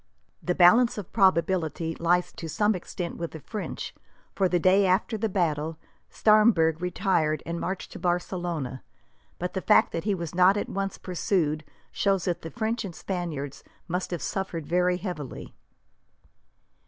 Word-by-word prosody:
The 180 - -1
balance 225 +8 +6
of 200 -4 -7
probability 170 -4 +2
lies 175 +2 +1
to 165 - -7
some 210 +7 +2
extent 175 -1 -5
with 170 -1 -5
the 160 - -7
French, 210 +7 -6 0.4
for 190 -2 +1
the 180 - +2
day 190 +3 +4
after 190 +5 +1
the 220 +1 -1
battle, 160 -4 -1 0.3
Staremberg 210 -7 +4
retired 180 -4 0
and 170 +1 -3
marched 190 +2 -4
to - - -8
Barcelona; 175 -7 -2 0.6
but 180 +1 -4
the 190 - -2
fact 215 +2 +4
that 165 +2 -4
he 205 -2 +1
was 170 -3 -5
not 185 +3 +5
at - - -3
once 195 0 -3
pursued 165 -4 -1 0.3
shows 195 -3 +1
that 175 -2 -1
the 165 - -6
French 230 +2 -2
and 185 -5 -7
Spaniards 160 -7 -4 0.2
must 180 +2 -2
have 175 -3 -4
suffered 185 -5 -3
very 180 +2 +2
heavily. 175 -8 -6
180 Hz, 155 wpm, -27 LUFS, 165-195 Hz, 0.6 s, balance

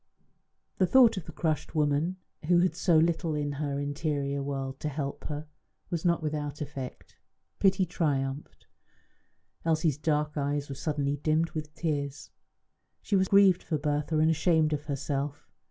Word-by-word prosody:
The 185 - +4
thought 240 0 +6
of 185 -4 -5
the - - -8
crushed 160 0 -2
woman, 150 +4 +1 0.3
who 175 0 +5
had 180 -2 +2
so 175 -2 +3
little 165 0 +2
in 145 -1 -1
her 140 -2 -1
interior 145 -1 -2
world 135 -1 -4
to 150 - -2
help 140 -1 -4
her, 150 0 -4 0.5
was 170 -2 -2
not 170 -2 +2
without 150 -1 -3
effect. 135 -3 -7 0.4
Pity 190 -1 +3
triumphed. 145 -5 -2 1.0
Elsie's 160 -3 +1
dark 150 -1 0
eyes 145 0 -1
were - - -4
suddenly 145 0 -1
dimmed 155 +3 +1
with 155 -1 -6
tears; 145 -4 -3 0.7
she 205 - 0
was 190 -1 +3
grieved 195 -2 +5
for 155 - -2
Bertha 150 +1 -1
and 160 +1 +4
ashamed 160 -1 +2
of 150 0 -3
herself. 140 0 -3
150 Hz, 155 wpm, -29 LUFS, 145-165 Hz, 1.0 s, thought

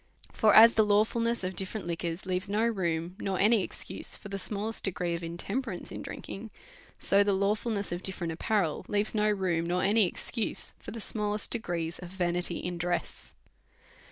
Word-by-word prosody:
For 215 -2 +4
as 230 +2 +10
the 220 - +4
lawfulness 220 +2 +2
of 185 0 -3
different 190 +2 -2
liquors 170 +1 -3
leaves 185 +1 -1
no 215 +3 +2
room, 175 -5 -1
nor 190 -1 -2
any 215 +2 +4
excuse, - - -3
for 205 - -10
the 195 0 -4
smallest 210 +3 -3
degree 180 -2 -1
of 170 0 -4
in 170 +1 -5
temperance 200 -1 -4
in - - -6
drinking; 215 +3 -7 0.5
so 200 +1 +3
the 200 0 +1
lawfulness 205 +1 0
of 175 +1 -3
different 175 -3 -4
apparel 180 -2 0
leaves 205 +1 0
no 215 -1 +2
room, 180 -5 0
nor 180 +1 0
any 205 0 +4
excuse, 225 +5 +1
for - - -9
the 230 - -6
small 210 0 0
est 210 - -3
degrees 170 -7 -3
of 180 - -8
vanity 175 -1 -1
in 175 -1 -4
dress. 175 +1 -3
195 Hz, 185 wpm, -29 LUFS, 175-215 Hz, 0.5 s, as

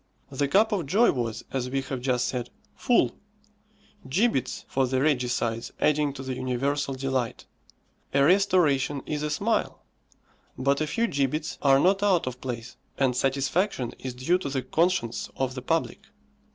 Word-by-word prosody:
The 140 +1 0
cup 210 +9 +3
of 185 -8 -1
joy 220 - +4
was, 115 -4 -3
as 130 -2 -1
we 135 +1 -1
have 130 -1 -5
just 125 -1 +1
said, 125 -2 -3 0.3
full; 245 - +2 1.0
gibbets 185 - 0
for 135 -1 +1
the 130 +1 0
regicides 125 -5 0
adding 150 -1 +2
to 135 -1 -7
the 130 -1 -3
universal 135 +2 -1
delight. 130 -3 -2 0.7
A 140 0 +3
restoration 160 -7 +3
is 150 -1 -3
a 150 - -1
smile; 150 - -1 0.7
but 140 +3 +1
a 155 - 0
few 230 +10 0
gibbets 150 - -1
are 135 -1 +5
not 195 +5 +3
out 195 -4 +3
of 125 -1 -6
place, 120 -2 -6 0.2
and 130 -3 +2
satisfaction 135 - 0
is 130 -2 -6
due 165 +9 +1
to 165 - -4
the 135 -2 -2
conscience 165 -9 0
of 130 -1 -1
the 125 - -6
public. 165 +5 -1
135 Hz, 160 wpm, -26 LUFS, 130-160 Hz, 1.0 s, are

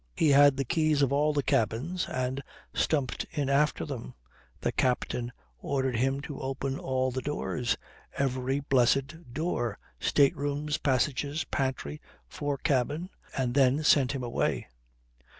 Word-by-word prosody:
He 155 - +3
had 140 -1 +6
the 135 - 0
keys 155 +1 +2
of 140 0 +2
all 150 +2 +3
the 145 -1 0
cabins, 135 +14 0
and 130 +1 -2 0.3
stumped 140 -5 0
in 145 -5 -2
after 150 +2 +2
them. 60 - -6 0.4
The - - 0
captain 125 -1 0 0.3
ordered 130 - -1
him 135 +3 +1
to 145 -1 -7
open 135 +1 -3
all 130 0 0
the 130 +1 -3
doors, 130 -4 -1 0.4
every 135 0 0
blessed 135 +3 +1
door; 120 - -1 0.2
state 140 -2 +3
rooms, 145 +1 -2
passages, 140 +3 0
pantry, 130 - -3 0.3
fore 145 - -3
cabin 145 +7 0 0.3
and 125 -2 0
then 135 +2 +4
sent 140 -3 +4
him 135 -2 -3
away. 120 - -1
135 Hz, 140 wpm, -29 LUFS, 130-145 Hz, 0.4 s, had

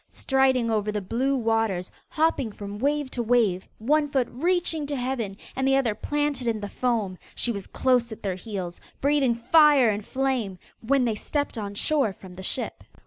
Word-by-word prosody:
Striding 260 -3 +2
over 210 -1 0
the 210 - -1
blue 250 +8 0
waters, 225 -6 0 0.2
hopping 310 -7 +1
from 205 0 -7
wave 285 +1 0
to 245 - -2
wave, 220 -6 +2
one 295 +6 +2
foot 265 -4 +1
reaching 330 +1 +1
to 290 - -2
heaven, 245 -6 -3 0.2
and 265 0 0
the 270 - +4
other 255 -5 +2
planted 290 0 -1
in 225 -2 0
the 205 - -4
foam, 220 -8 -1 0.2
she 240 - 0
was 200 -4 -5
close 250 -3 +1
at 220 - -9
their 195 -2 0
heels, 185 -2 -6 0.2
breathing 275 -4 +2
fire 285 +1 +5
and 205 0 -3
flame, 255 -7 -1 0.2
when 255 +2 +2
they 230 - +1
stepped 285 +7 -2
on 205 -2 -4
shore 270 -2 +1
from 185 -1 -13
the 185 - -9
ship. 240 +6 -2
240 Hz, 185 wpm, -26 LUFS, 210-275 Hz, 0.2 s, fire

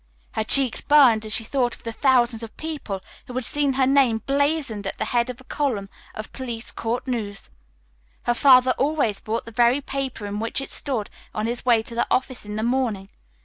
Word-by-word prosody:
Her 220 - -2
cheeks 260 +2 +5
burned 245 -7 +5
as 215 - +4
she - - +1
thought 245 +1 -1
of - - -23
the 230 - -4
thousands 245 -3 +2
of 225 -1 -9
people 295 -12 -5 0.3
who 250 - -9
had 255 -2 -2
seen 285 0 +1
her 260 0 +2
name 255 -5 +3
blazoned 280 -7 0
at - - -5
the - - -2
head 240 0 0
of 250 0 -7
a - - -15
column 250 -9 -2 0.3
of 215 - -7
police 240 -3 -6
court 240 +3 -3
news. 215 -5 -4 0.7
Her 240 - +1
father 255 0 +5
always 275 -8 0
bought 225 +2 -3
the 230 - -9
very 240 +3 +3
paper 270 -5 -5
in 205 +1 -4
which 225 +4 -1
it 275 - -5
stood 245 -8 -1 0.2
on 215 - -2
his 240 +2 -3
way 230 -2 +4
to 235 - -9
the 235 - 0
office 255 -3 -1
in 210 0 -6
the 215 - -2
morning. 230 -6 -1
240 Hz, 210 wpm, -23 LUFS, 220-270 Hz, 0.7 s, cheeks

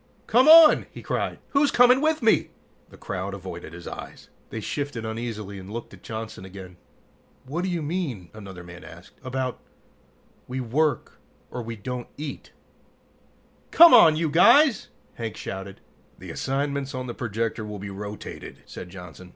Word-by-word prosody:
"Come 250 +5 +4
on!" 320 -1 +8
he - - -11
cried. - - -2
"Who's 280 0 +3
coming 250 +2 +5
with 310 -3 +1
me?" 220 - +3 0.4
The - - -16
crowd 95 +1 -5
avoided 90 -4 -8
his 85 0 -10
eyes. - - -9 0.2
They 115 - -5
shifted 135 0 -4
uneasily 110 -3 -5
and 95 +1 -11
looked 115 +1 -7
at - - -14
Johnson 110 -3 -7
again. 95 -1 -11 0.7
"What 155 +7 -3
do 190 - -1
you 170 -3 -2
mean?" 145 - -4
another 95 -4 -10
man 90 +1 -12
asked. 90 +3 -14
"About, 130 0 -3 0.9
we 130 +1 -4
work 135 +3 -1 0.3
or 125 - -5
we 115 0 -6
don't 125 +3 -6
eat 150 -1 -7 0.6
" - - -35
"Come 340 -2 +8
on, 165 -10 +8
you 160 -1 -1
guys!" 255 - +5 0.3
Hank 115 -2 -6
shouted. 95 0 -7 0.4
"The - - -9
assignments 140 0 -2
on 130 0 -4
the 120 - -5
projector 115 -1 -3
will 105 -1 -6
be 100 0 -7
rotated," 105 +1 -8
said 90 - -9
Johnson. 90 -1 -11
120 Hz, 160 wpm, -25 LUFS, 100-155 Hz, 0.9 s, on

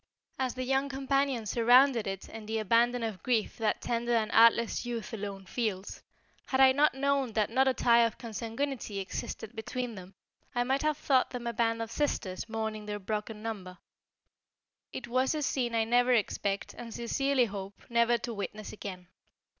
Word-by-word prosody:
As 260 -2 -1
the 255 - -3
young 270 +2 +1
companions 270 -4 0
surrounded 245 0 +5
it 195 0 -4
in 220 -1 -9
the 220 +1 -1
abandon 230 +3 +2
of 220 -4 -4
grief 235 -4 0
that 220 -2 0
tender 235 0 0
and 220 -1 +1
artless 230 0 +5
youth 235 -3 -5
alone 200 -2 -5
feels, 205 -3 -3 0.5
had 265 - 0
I 265 0 +8
not 285 -1 +3
known 275 -3 0
that 215 -1 +1
not 265 +2 +3
a 265 - +4
tie 235 0 +5
of 230 -1 0
consanguinity 230 0 -4
existed 205 +3 -5
between 245 +2 -4
them, 190 -1 -11 0.4
I 245 - +2
might 265 +2 0
have 305 -1 +1
thought 265 -4 +2
them 245 -2 -6
a 235 - -2
band 230 0 +1
of 225 - -8
sisters 225 -9 -2
mourning 220 -1 -3
their 210 0 -3
broken 210 +1 -4
number. 190 -5 -5 1.1
It 235 - -6
was 255 +4 +1
a 300 - -1
scene 245 -4 0
I 225 - +3
never 245 +2 +3
expect 200 -3 -1
and 235 -1 -9
sincerely 265 +3 +1
hope 200 -2 -7
never 235 0 +3
to 235 0 -5
witness 210 +1 -6
again. 185 -4 -8
230 Hz, 180 wpm, -30 LUFS, 215-255 Hz, 1.1 s, I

